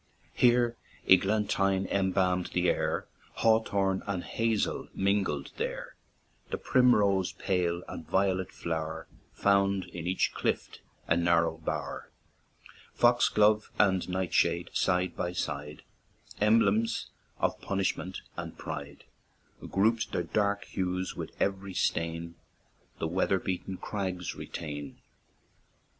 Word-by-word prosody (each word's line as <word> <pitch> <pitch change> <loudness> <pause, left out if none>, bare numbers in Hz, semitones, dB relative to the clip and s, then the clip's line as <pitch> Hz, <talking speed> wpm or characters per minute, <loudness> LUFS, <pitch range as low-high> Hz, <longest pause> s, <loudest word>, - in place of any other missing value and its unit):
Here 120 -1 +3 0.3
eglantine 95 0 +3
embalm'd 95 -2 +1
the 90 0 +3
air, - - -1 0.3
Hawthorn 100 -4 +2
and 95 -3 -2
hazel 115 -2 -1
mingled 95 -7 0
there; - - -4 0.5
The - - -2
primrose 100 -7 +3
pale 90 -2 -1
and 80 - -8
violet 95 -1 +1
flower, 80 -1 -4 0.3
Found 100 -1 +2
in 85 -1 -7
each 95 - +1
clift - - -2 0.3
a 80 - +3
narrow 85 -1 +2
bower; 80 - -4 0.9
Foxglove 110 -3 +4
and 95 -3 +3
nightshade, 90 -2 +1
side 90 0 +1
by 90 - -2
side, 75 -3 -4 0.6
Emblems 110 +1 +2 0.3
of - - -1
punishment 95 -1 -2
and - - -6
pride, 70 -2 -7 0.7
Group'd 110 +4 +1
their 90 - 0
dark 100 +3 0
hues 95 -1 -2
with - - -7
every 95 -1 -1
stain 85 0 -1 0.6
The 80 - -2
weather 95 +3 +1
beaten 95 0 -4
crags 95 -4 -3
retain. 75 -3 -6
95 Hz, 105 wpm, -29 LUFS, 85-100 Hz, 0.9 s, Foxglove